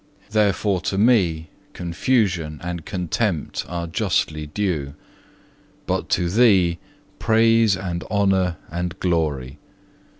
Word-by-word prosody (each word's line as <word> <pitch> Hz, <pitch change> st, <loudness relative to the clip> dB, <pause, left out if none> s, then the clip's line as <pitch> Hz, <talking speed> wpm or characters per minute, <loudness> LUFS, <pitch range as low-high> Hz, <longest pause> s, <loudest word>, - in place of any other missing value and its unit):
Therefore 100 Hz, -2 st, +1 dB
to 95 Hz, +1 st, -2 dB
me 95 Hz, -8 st, +3 dB, 0.3 s
confusion 85 Hz, -, 0 dB
and 85 Hz, -2 st, -5 dB
contempt 95 Hz, -2 st, -2 dB
are 85 Hz, 0 st, -3 dB
justly 75 Hz, -2 st, -1 dB
due, 75 Hz, -5 st, -2 dB, 0.9 s
but -, -, -2 dB
to 90 Hz, -, +1 dB
Thee 95 Hz, -4 st, +4 dB, 0.4 s
praise 115 Hz, -2 st, +4 dB
and 90 Hz, -2 st, -4 dB
honour 95 Hz, -4 st, +1 dB
and 90 Hz, +2 st, -4 dB
glory. 75 Hz, -6 st, -1 dB
90 Hz, 100 wpm, -22 LUFS, 85-105 Hz, 0.9 s, Thee